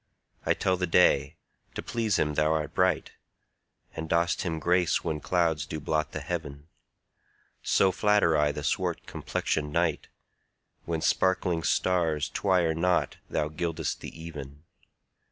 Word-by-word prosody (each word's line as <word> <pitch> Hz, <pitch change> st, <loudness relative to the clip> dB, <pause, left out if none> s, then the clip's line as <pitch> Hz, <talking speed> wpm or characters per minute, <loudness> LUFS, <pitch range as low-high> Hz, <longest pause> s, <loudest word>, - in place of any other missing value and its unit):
I -, -, +3 dB
tell 95 Hz, -1 st, +1 dB
the 90 Hz, 0 st, -1 dB
day, 90 Hz, +2 st, +3 dB, 0.4 s
to -, -, -4 dB
please 110 Hz, -4 st, 0 dB
him 75 Hz, -, +1 dB
thou 75 Hz, +1 st, +2 dB
art 80 Hz, -1 st, -2 dB
bright, 90 Hz, -3 st, +1 dB, 0.8 s
And 80 Hz, 0 st, -5 dB
dost 85 Hz, +1 st, +1 dB
him 85 Hz, -3 st, -2 dB
grace 90 Hz, +1 st, +2 dB
when 75 Hz, -1 st, -2 dB
clouds 80 Hz, -4 st, 0 dB
do 80 Hz, -, -4 dB
blot 75 Hz, +1 st, -1 dB
the -, -, -5 dB
heaven: 75 Hz, -4 st, -5 dB, 0.9 s
So 95 Hz, -, +3 dB
flatter 105 Hz, -4 st, +3 dB
I 75 Hz, -1 st, +3 dB
the 75 Hz, 0 st, -6 dB
swart -, -, -1 dB
complexion'd 75 Hz, -1 st, -2 dB
night, -, -, 0 dB, 0.8 s
When 80 Hz, -1 st, -2 dB
sparkling 90 Hz, -2 st, +1 dB
stars 80 Hz, -4 st, +1 dB
twire 90 Hz, -5 st, +1 dB
not 90 Hz, +3 st, +1 dB
thou 75 Hz, -, 0 dB
gild'st 80 Hz, 0 st, -3 dB
the -, -, -7 dB
even. 75 Hz, -3 st, -9 dB
80 Hz, 140 wpm, -28 LUFS, 75-90 Hz, 0.9 s, I